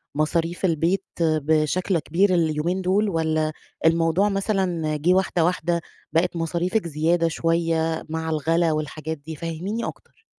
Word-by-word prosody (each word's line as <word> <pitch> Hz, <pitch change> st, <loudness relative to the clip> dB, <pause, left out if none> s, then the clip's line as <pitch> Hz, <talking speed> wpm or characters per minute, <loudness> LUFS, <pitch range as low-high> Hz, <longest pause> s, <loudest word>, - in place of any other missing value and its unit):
مصاريف 165 Hz, +4 st, 0 dB
البيت 170 Hz, +3 st, +1 dB, 0.2 s
بشكل 160 Hz, +3 st, +1 dB
كبير 185 Hz, +6 st, +2 dB
اليومين 170 Hz, +2 st, +1 dB
دول، 200 Hz, +3 st, +2 dB
والّا 160 Hz, -3 st, 0 dB, 0.3 s
الموضوع 165 Hz, +4 st, +3 dB
مثلًا 190 Hz, -6 st, 0 dB
جِه 170 Hz, +5 st, +3 dB
واحدة 185 Hz, -3 st, +2 dB
واحدة، 170 Hz, -1 st, 0 dB, 0.3 s
بقِت 175 Hz, +2 st, +2 dB
مصاريفِك 170 Hz, +4 st, -1 dB
زيادة 165 Hz, +2 st, +1 dB
شوية 165 Hz, 0 st, 0 dB
مع 160 Hz, 0 st, -3 dB
الغلا 165 Hz, +2 st, +1 dB
والحاجات 155 Hz, +1 st, -3 dB
دي؟ 155 Hz, +2 st, -8 dB
فهّميني 170 Hz, +8 st, -4 dB
أكتر. 445 Hz, -, -10 dB
165 Hz, 125 wpm, -23 LUFS, 160-180 Hz, 0.3 s, الموضوع